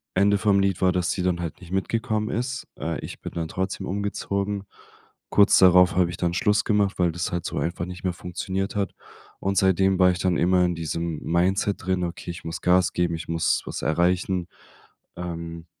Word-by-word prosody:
Ende 100 Hz, +2 st, +4 dB
vom 100 Hz, -1 st, +3 dB
Lied 95 Hz, -2 st, +1 dB
war, 95 Hz, -, +4 dB
dass 90 Hz, 0 st, 0 dB
sie 90 Hz, -, -2 dB
dann 90 Hz, -1 st, 0 dB
halt 85 Hz, -3 st, -5 dB
nicht 90 Hz, 0 st, -12 dB
mitgekommen 110 Hz, +2 st, -1 dB
ist. 125 Hz, +2 st, -3 dB
Äh, 80 Hz, +2 st, -3 dB
ich -, -, -8 dB
bin -, -, -7 dB
dann 85 Hz, -1 st, -3 dB
trotzdem 95 Hz, +1 st, -3 dB
umgezogen. 100 Hz, 0 st, -2 dB, 0.7 s
Kurz 100 Hz, -1 st, +5 dB
darauf 90 Hz, -1 st, +6 dB
habe 90 Hz, -1 st, +3 dB
ich 85 Hz, -, -7 dB
dann 85 Hz, -2 st, 0 dB
Schluss 105 Hz, +4 st, +2 dB
gemacht, 100 Hz, -3 st, +1 dB
weil 85 Hz, -1 st, +3 dB
das 85 Hz, +2 st, -3 dB
halt 85 Hz, -1 st, -3 dB
so -, -, -4 dB
einfach 85 Hz, +1 st, -2 dB
nicht 90 Hz, 0 st, -9 dB
mehr 90 Hz, -, 0 dB
funktioniert 95 Hz, +3 st, -4 dB
hat. 100 Hz, -1 st, -1 dB, 0.5 s
Und 95 Hz, 0 st, -1 dB
seitdem 95 Hz, +1 st, +3 dB
war 90 Hz, 0 st, +6 dB
ich 90 Hz, -, -4 dB
dann 90 Hz, -2 st, +1 dB
immer 90 Hz, +1 st, +3 dB
in 90 Hz, -, 0 dB
diesem 85 Hz, 0 st, -3 dB
Mindset 95 Hz, +4 st, +1 dB
drin: 95 Hz, -1 st, 0 dB
„Okay, 85 Hz, 0 st, -5 dB
ich 85 Hz, -, -9 dB
muss 80 Hz, +1 st, -5 dB
Gas 90 Hz, 0 st, +3 dB
geben, 85 Hz, -1 st, 0 dB
ich 80 Hz, -, -7 dB
muss 85 Hz, 0 st, +1 dB
was -, -, -5 dB
erreichen. 90 Hz, +3 st, +1 dB, 0.7 s
Ähm“ 85 Hz, -1 st, -6 dB
90 Hz, 200 wpm, -24 LUFS, 85-95 Hz, 0.7 s, darauf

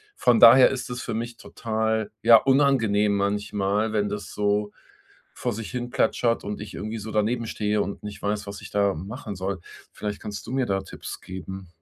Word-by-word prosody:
von 120 Hz, -2 st, +3 dB
daher 125 Hz, +3 st, +9 dB
ist 130 Hz, -2 st, -4 dB
es 125 Hz, 0 st, -4 dB
für 115 Hz, -, -4 dB
mich 115 Hz, +1 st, -4 dB
total, 110 Hz, -1 st, -2 dB
ja, 115 Hz, 0 st, +9 dB
unangenehm 115 Hz, -7 st, +3 dB
manchmal, 105 Hz, +1 st, 0 dB
wenn 105 Hz, -1 st, +1 dB
das 105 Hz, -2 st, -6 dB
so 105 Hz, 0 st, 0 dB, 0.6 s
vor 120 Hz, -2 st, -2 dB
sich 110 Hz, 0 st, -6 dB
hin 125 Hz, -1 st, -4 dB
plätschert 115 Hz, -1 st, +1 dB
und 105 Hz, 0 st, -4 dB
ich 105 Hz, -, -8 dB
irgendwie 110 Hz, +2 st, -4 dB
so 110 Hz, +2 st, -7 dB
daneben 115 Hz, +3 st, 0 dB
stehe 105 Hz, -1 st, 0 dB
und 100 Hz, -, -5 dB
nicht 105 Hz, -1 st, -7 dB
weiß, 105 Hz, 0 st, -2 dB
was 100 Hz, 0 st, -7 dB
ich -, -, -10 dB
da 100 Hz, -1 st, +2 dB
machen 105 Hz, -, -7 dB
soll. 95 Hz, 0 st, -3 dB, 0.3 s
Vielleicht 105 Hz, -1 st, -5 dB
kannst 105 Hz, -1 st, -7 dB
du -, -, -6 dB
mir 130 Hz, -1 st, +1 dB
da 95 Hz, -1 st, +1 dB
Tipps -, -, -8 dB
geben? 95 Hz, 0 st, -8 dB
105 Hz, 195 wpm, -25 LUFS, 100-115 Hz, 0.6 s, daher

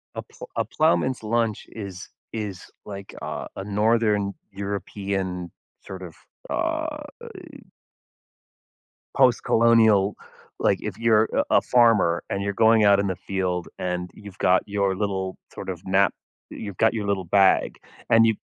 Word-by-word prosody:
A -, -, -3 dB
pl -, -, -12 dB
a -, -, +1 dB
ploughman's 115 Hz, +8 st, +1 dB
lunch 115 Hz, -1 st, 0 dB
is 100 Hz, -4 st, -8 dB, 0.2 s
is 105 Hz, -5 st, -6 dB
like 100 Hz, -1 st, -8 dB
a -, -, -5 dB
a 95 Hz, -, -5 dB
northern 105 Hz, 0 st, +1 dB, 0.2 s
European 95 Hz, -2 st, -4 dB, 0.3 s
sort 95 Hz, -1 st, -9 dB
of 85 Hz, -3 st, -9 dB, 0.4 s
uh, -, -, -2 dB, 0.5 s
eh -, -, -11 dB, 1.6 s
postcolonial 115 Hz, -5 st, +4 dB, 0.5 s
like -, -, +2 dB
if -, -, -5 dB
you're 115 Hz, -1 st, +3 dB
a -, -, +2 dB
a -, -, +4 dB
farmer 115 Hz, -8 st, +3 dB
and 100 Hz, -, -2 dB
you're 100 Hz, 0 st, -2 dB
going 110 Hz, +1 st, +4 dB
out 100 Hz, -1 st, +6 dB
in 100 Hz, -, 0 dB
the 95 Hz, -, -1 dB
field 90 Hz, -2 st, -2 dB
and 90 Hz, 0 st, -3 dB
you've 100 Hz, -2 st, -12 dB
got 90 Hz, 0 st, +4 dB
your 100 Hz, -2 st, 0 dB
little 95 Hz, -2 st, -2 dB, 0.2 s
sort -, -, -8 dB
of 90 Hz, -2 st, -5 dB
knap 95 Hz, 0 st, +4 dB, 0.4 s
you've 100 Hz, -4 st, -7 dB
got 110 Hz, -, +3 dB
your 105 Hz, -3 st, -3 dB
little 95 Hz, -2 st, -1 dB
bag, 95 Hz, +2 st, +3 dB, 0.3 s
and 115 Hz, 0 st, +6 dB
you 110 Hz, -2 st, +3 dB
100 Hz, 145 wpm, -24 LUFS, 95-110 Hz, 1.6 s, out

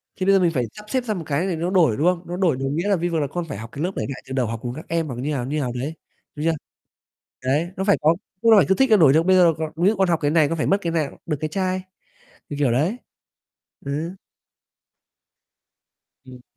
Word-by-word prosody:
thì 185 Hz, -, -3 dB
bây 195 Hz, -, +5 dB
giờ -, -, +5 dB
mình 175 Hz, -2 st, +3 dB
phải 125 Hz, -3 st, 0 dB
sắp 210 Hz, 0 st, -12 dB
xếp 260 Hz, -2 st, 0 dB
ra 220 Hz, -3 st, -2 dB
một 175 Hz, -4 st, -5 dB
cái 150 Hz, +5 st, -1 dB
thì 180 Hz, -, -1 dB
nó 170 Hz, +2 st, -2 dB
đổi, 170 Hz, -, +3 dB
đúng 155 Hz, -, 0 dB
không? 180 Hz, -1 st, +1 dB
Nó 175 Hz, -, -4 dB
đổi 175 Hz, -8 st, +2 dB
đồng 135 Hz, +1 st, -2 dB
nghĩa 170 Hz, +5 st, -1 dB
là 200 Hz, -, +4 dB
vi 175 Hz, 0 st, -1 dB
vờ 165 Hz, -, 0 dB
là 145 Hz, -, 0 dB
con 175 Hz, +4 st, -4 dB
phải -, -, -5 dB
học 110 Hz, +2 st, -8 dB
cái 145 Hz, -, -5 dB
lớp 180 Hz, -, 0 dB
để -, -, -2 dB
ngại 130 Hz, -, -6 dB
từ 130 Hz, -, -6 dB
đầu 130 Hz, -3 st, 0 dB
học 115 Hz, 0 st, -4 dB
cùng 120 Hz, 0 st, -3 dB
các 155 Hz, -, -9 dB
em 165 Hz, -1 st, 0 dB
hoặc 130 Hz, -, -5 dB
như 135 Hz, +5 st, -3 dB
nào, 125 Hz, -4 st, -2 dB
như 150 Hz, +3 st, -2 dB
nào 125 Hz, -3 st, -2 dB
đấy, 135 Hz, +6 st, -3 dB, 0.4 s
đúng 150 Hz, +2 st, -4 dB
chưa? 165 Hz, -, +3 dB, 0.9 s
Đấy, 150 Hz, +7 st, +1 dB
nó 190 Hz, -, -2 dB
phải 200 Hz, 0 st, +4 dB
có 155 Hz, +2 st, +4 dB, 0.3 s
đúng 230 Hz, -1 st, +5 dB
rồi, 200 Hz, -7 st, +7 dB
cứ 190 Hz, -, +4 dB
thích 265 Hz, +2 st, +2 dB
là 215 Hz, -, +7 dB
đổi 155 Hz, -8 st, +6 dB
được, 160 Hz, +3 st, +3 dB
bây 185 Hz, 0 st, +5 dB
giờ 175 Hz, -2 st, +6 dB
cò 160 Hz, -1 st, -3 dB
ví 175 Hz, +4 st, +3 dB
dụ 220 Hz, -, +2 dB
con 190 Hz, -2 st, +2 dB
học 170 Hz, -, +2 dB
cái 145 Hz, -, +2 dB
này 155 Hz, -2 st, +4 dB
con 165 Hz, -, -2 dB
phải -, -, 0 dB
mất 195 Hz, -, +3 dB
cái 170 Hz, -2 st, -2 dB
nào, 155 Hz, -4 st, -2 dB
được 155 Hz, -3 st, -1 dB
cái 155 Hz, -, -2 dB
chai, 185 Hz, +2 st, -1 dB, 0.7 s
như 145 Hz, -, -5 dB
kiểu 135 Hz, -5 st, +2 dB
đấy. 160 Hz, -, +1 dB, 0.9 s
Ừ. 160 Hz, +6 st, -3 dB, 2.1 s
Ừm. 125 Hz, -1 st, -12 dB
165 Hz, 280 wpm, -22 LUFS, 140-185 Hz, 2.1 s, rồi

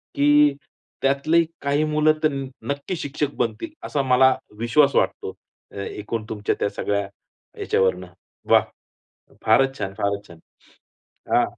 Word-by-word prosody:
की 145 Hz, 0 st, +5 dB, 0.5 s
त्यातली 140 Hz, +5 st, +3 dB, 0.2 s
काही 140 Hz, +2 st, +1 dB
मुलं 155 Hz, 0 st, +3 dB
तर 155 Hz, -, +5 dB
न 135 Hz, -1 st, -4 dB, 0.3 s
नक्की 145 Hz, +6 st, -4 dB
शिक्षक 145 Hz, -1 st, -3 dB
बनतील, 335 Hz, -, -2 dB
असा 145 Hz, -, -1 dB
मला 130 Hz, 0 st, +4 dB, 0.2 s
विश्वास 135 Hz, +6 st, +3 dB
वाटतो, -, -, 0 dB, 0.4 s
ए 100 Hz, 0 st, -5 dB
एकूण 110 Hz, +1 st, -4 dB
तुमच्या 105 Hz, -2 st, -1 dB
त्या -, -, +1 dB
सगळ्या 100 Hz, -1 st, -2 dB, 0.5 s
याच्यावरन. 95 Hz, -1 st, +1 dB, 0.4 s
वाह! -, -, +6 dB, 0.8 s
फारच 135 Hz, 0 st, +4 dB
छान! 95 Hz, -2 st, -3 dB
फारच 100 Hz, -1 st, -2 dB
छान! 85 Hz, -, -14 dB, 1.0 s
हा. -, -, +5 dB
135 Hz, 130 wpm, -23 LUFS, 105-150 Hz, 1.0 s, वाह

